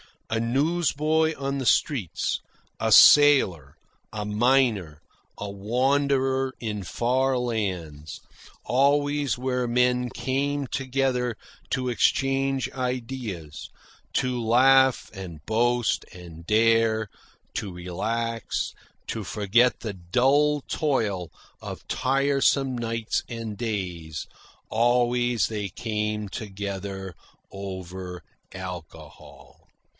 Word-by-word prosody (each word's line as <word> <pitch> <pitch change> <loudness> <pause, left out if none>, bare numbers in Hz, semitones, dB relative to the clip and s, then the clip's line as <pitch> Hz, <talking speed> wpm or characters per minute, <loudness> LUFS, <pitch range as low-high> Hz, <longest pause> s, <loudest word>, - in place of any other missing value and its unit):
A 115 - +1
newsboy 155 +4 +1
on 140 0 -2
the 130 - -3
streets, 115 - +1 0.4
a - - 0
sailor, 115 - +6 0.4
a 105 -1 -3
miner, 105 - +2 0.4
a 100 -1 -5
wanderer 130 +5 +1
in 105 -3 -4
far 130 +7 +1
lands, 90 -11 -3 0.4
always 145 0 +2
where 125 -1 -1
men 125 +1 +2
came 140 +3 -1
together 130 -2 -1 0.4
to 130 -1 0
exchange 135 +2 +1
ideas, 125 - -5 0.4
to 125 -1 0
laugh 130 +3 +4
and 90 -7 -9
boast 115 -6 +1
and 85 -2 -11
dare, 110 0 +3 0.5
to 100 - -3
relax, 115 +7 -3 0.3
to 110 -3 -4
forget 110 +6 +2
the 110 -3 -4
dull 135 +11 +2
toil 110 - -1 0.3
of - - -8
tiresome 135 0 +2
nights 115 -1 -1
and 115 -3 -6
days, 90 - -4 0.4
always 120 0 +2
they 105 -2 -3
came 105 +1 -3
together 95 -2 -5 0.4
over 95 -2 -7 0.3
alcohol. 85 -5 -10
115 Hz, 90 wpm, -25 LUFS, 100-130 Hz, 0.5 s, sailor